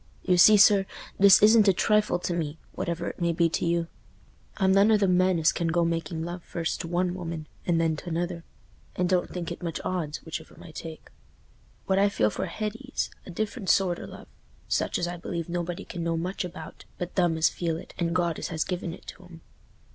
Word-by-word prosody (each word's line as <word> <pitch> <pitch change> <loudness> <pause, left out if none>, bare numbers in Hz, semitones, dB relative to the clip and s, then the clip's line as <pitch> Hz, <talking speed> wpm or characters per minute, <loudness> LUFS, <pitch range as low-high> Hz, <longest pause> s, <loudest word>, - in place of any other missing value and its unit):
You 180 - +3
see, 210 +4 +8
sir, 195 -1 +6 0.3
this 200 +1 +7
isn't 215 0 +7
a 195 - +6
trifle 210 +3 +2
to 175 0 -3
me, 160 -2 -3
whatever 170 0 -3
it - - -10
may 170 0 +1
be 165 0 +2
to - - -2
you. 170 0 0 0.7
I'm 190 -2 +3
none 200 +3 +5
o' 215 - +6
them 195 -3 +2
men 185 0 +3
as 160 -1 +3
can 170 - -2
go 170 +1 +2
making 165 0 -2
love 175 +1 -5
first 165 -2 -3
to 170 - -6
one 175 +1 0
woman 170 -3 -5 0.2
and 170 -2 +2
then 165 -1 +1
t' 175 - -7
another, 170 0 -3 0.5
and 180 - +1
don't 180 -1 +1
think 175 -2 -5
it 170 - -7
much 170 -2 -3
odds 160 -5 -3
which 160 - -4
of 160 - -16
'em - - -15
I 165 - -11
take. 160 0 -9 0.7
What 190 0 +2
I 200 +1 +4
feel 105 - +1
for 190 - -3
Hetty's 220 +8 -4 0.2
a - - -8
different 205 +2 -3
sort 180 -3 +3
o' - - -7
love, - - -11 0.4
such - - 0
as 175 - -1
I 175 0 -5
believe 170 -1 -4
nobody 175 +2 -3
can 175 -2 -6
know 165 0 -1
much 180 +4 -3
about 170 -3 -9
but 180 0 -5
them 175 -3 +2
as 160 - +4
feel 165 -2 -2
it 170 - -11
and 170 0 0
God 170 -3 0
as - - -3
has 160 -2 -1
given 180 -2 -4
it - - -19
to 185 - -11
'em. 170 -2 -14
175 Hz, 230 wpm, -27 LUFS, 165-185 Hz, 0.7 s, see